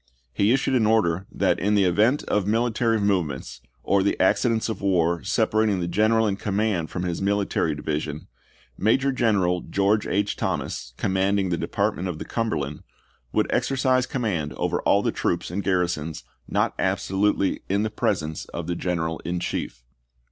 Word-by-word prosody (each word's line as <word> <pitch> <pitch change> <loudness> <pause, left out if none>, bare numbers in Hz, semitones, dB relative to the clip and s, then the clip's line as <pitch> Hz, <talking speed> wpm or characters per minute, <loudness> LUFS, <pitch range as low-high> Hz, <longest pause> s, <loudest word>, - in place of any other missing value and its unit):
He 100 +3 +2
issued 135 +1 +1
an 115 -4 +3
order 95 -5 +2
that - - +1
"in 105 +3 +1
the 100 - +4
event 105 +10 +3
of 105 -2 0
military 115 0 +1
movements 75 -11 -1 0.2
or 100 0 +2
the 100 - 0
accidents 115 +4 +2
of 110 - -4
war 85 -3 +2
separating 110 -1 +1
the 85 - -2
general 110 +5 +3
in 100 -2 0
command 100 -5 -1
from 90 - -4
his 90 0 -2
military 100 -6 0
division, 75 0 -3 0.5
Ma 110 +3 +4
jor 135 +1 0
G 130 -1 -3
eneral 90 -6 +1
George 100 +3 +1
H. 100 +1 0
Thomas, - - -3
commanding 95 0 +1
the 85 - +1
Department 90 +2 -1
of 90 -4 -4
the - - -6
Cumberland, 75 - -2 0.5
would - - +2
exercise 130 -1 +1
command 95 - -2
over - - -1
all - - +3
the - - +1
troops - - -2
and 100 +3 -2
garrisons 90 -4 -1 0.2
not - - 0
absolutely 100 0 +1
in 100 +2 +1
the 110 - -2
presence 80 -6 -1
of 85 - -6
the 85 +1 -2
General 80 -2 -2
in 90 +1 -3
Chief." - - -4
95 Hz, 170 wpm, -24 LUFS, 85-110 Hz, 0.5 s, the